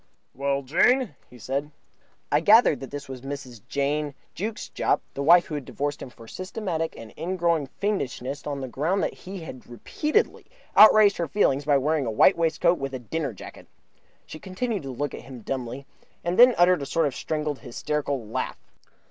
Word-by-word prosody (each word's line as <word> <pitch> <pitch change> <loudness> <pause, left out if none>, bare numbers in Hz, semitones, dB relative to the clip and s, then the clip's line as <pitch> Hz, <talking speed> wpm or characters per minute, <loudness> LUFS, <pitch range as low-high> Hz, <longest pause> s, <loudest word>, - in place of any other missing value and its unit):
"Well, 140 +1 -1
Jane," 230 - +3 0.2
he 125 - -14
said. 135 +5 -3 0.6
I - - +4
gathered 220 - +5
that 135 - -8
this 145 0 -7
was 130 -2 -8
Mrs. 135 -4 -7
Jane 145 +1 -1 0.2
Jukes 210 +4 -4
Jopp, - - +1
the 140 - -4
wife 170 +4 +6
who - - -8
had 145 -2 -3
divorced 145 +3 -4
him - - -7
for 115 -1 -15
systematic 185 - -4
and 115 -1 -11
ingrowing 170 -3 0
fiendishness 140 -7 -3
on 140 -2 -3
the 130 - -4
ground 160 +10 0
that - - -1
he 190 0 -9
had 130 -6 -10
repeatedly 300 - -1 0.3
outraged 215 -1 +8
her 170 - -1
feelings 140 -6 +1
by 145 -2 +4
wearing 145 -1 0
a - - 0
white 150 - +5
waistcoat 165 +1 +2
with 135 -1 -4
a - - -2
dinner 140 +3 -3
jacket. 100 - -12 0.6
She 155 - -10
continued 200 +4 -3
to 135 - -6
look 145 +3 -3
at - - -7
him 130 -3 -11
dumbly, 130 +2 -5 0.4
and 175 +4 -1
then 245 0 +8
uttered 175 -2 +4
a 140 - -4
sort 165 -1 +1
of 140 - -1
strangled, 150 0 -3
hysterical 140 0 -3
laugh. 105 - -3
145 Hz, 185 wpm, -25 LUFS, 135-175 Hz, 0.6 s, outraged